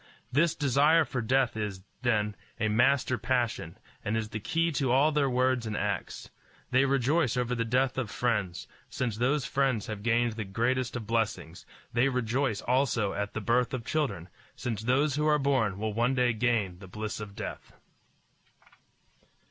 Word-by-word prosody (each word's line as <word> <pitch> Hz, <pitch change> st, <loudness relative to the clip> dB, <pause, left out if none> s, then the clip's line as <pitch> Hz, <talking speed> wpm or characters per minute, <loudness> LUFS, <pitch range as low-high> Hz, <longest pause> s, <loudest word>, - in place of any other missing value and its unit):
This 155 Hz, +5 st, +3 dB
desire 145 Hz, +4 st, +4 dB
for 125 Hz, -, -3 dB
death 130 Hz, +1 st, +1 dB
is, 105 Hz, -4 st, -4 dB, 0.2 s
then, 105 Hz, -4 st, +1 dB, 0.2 s
a 110 Hz, -, +1 dB
master 130 Hz, +2 st, +2 dB
passion, 120 Hz, -8 st, -1 dB, 0.3 s
and 110 Hz, +2 st, -1 dB
is 110 Hz, -1 st, -3 dB
the 110 Hz, -, -4 dB
key 165 Hz, +9 st, 0 dB
to 135 Hz, -4 st, 0 dB
all 140 Hz, +5 st, +4 dB
their 145 Hz, -2 st, +2 dB
words 125 Hz, -1 st, +1 dB
and 105 Hz, -, -3 dB
acts. 100 Hz, -2 st, -3 dB, 0.4 s
They 130 Hz, +2 st, +4 dB
rejoice 135 Hz, 0 st, +2 dB
over 125 Hz, 0 st, 0 dB
the 115 Hz, -1 st, 0 dB
death 130 Hz, +3 st, +1 dB
of 120 Hz, -5 st, -3 dB
friends, 105 Hz, -7 st, -1 dB, 0.2 s
since 120 Hz, -4 st, -2 dB
those 130 Hz, +4 st, +1 dB
friends 135 Hz, -6 st, 0 dB
have 105 Hz, -2 st, -6 dB
gained 120 Hz, +1 st, +2 dB
the 110 Hz, 0 st, -4 dB
greatest 120 Hz, +6 st, -1 dB
of 120 Hz, -3 st, -4 dB
blessings; 110 Hz, -6 st, -2 dB, 0.3 s
they 120 Hz, +3 st, +3 dB
rejoice 125 Hz, -2 st, 0 dB
also 125 Hz, -5 st, +1 dB
at 100 Hz, 0 st, -4 dB
the 110 Hz, -, -2 dB
birth 120 Hz, +3 st, +1 dB
of 115 Hz, -3 st, -6 dB
children, 115 Hz, -, -1 dB, 0.3 s
since 115 Hz, -4 st, -3 dB
those 135 Hz, +5 st, +1 dB
who 150 Hz, +1 st, +1 dB
are 150 Hz, -1 st, +4 dB
born 130 Hz, -9 st, +1 dB
will 110 Hz, +1 st, -2 dB
one 120 Hz, +4 st, +1 dB
day 125 Hz, -2 st, +2 dB
gain 110 Hz, -6 st, 0 dB
the 95 Hz, -, -11 dB
bliss 105 Hz, +3 st, -5 dB
of 105 Hz, -2 st, -8 dB
death. -, -, -7 dB
120 Hz, 170 wpm, -29 LUFS, 110-135 Hz, 0.4 s, desire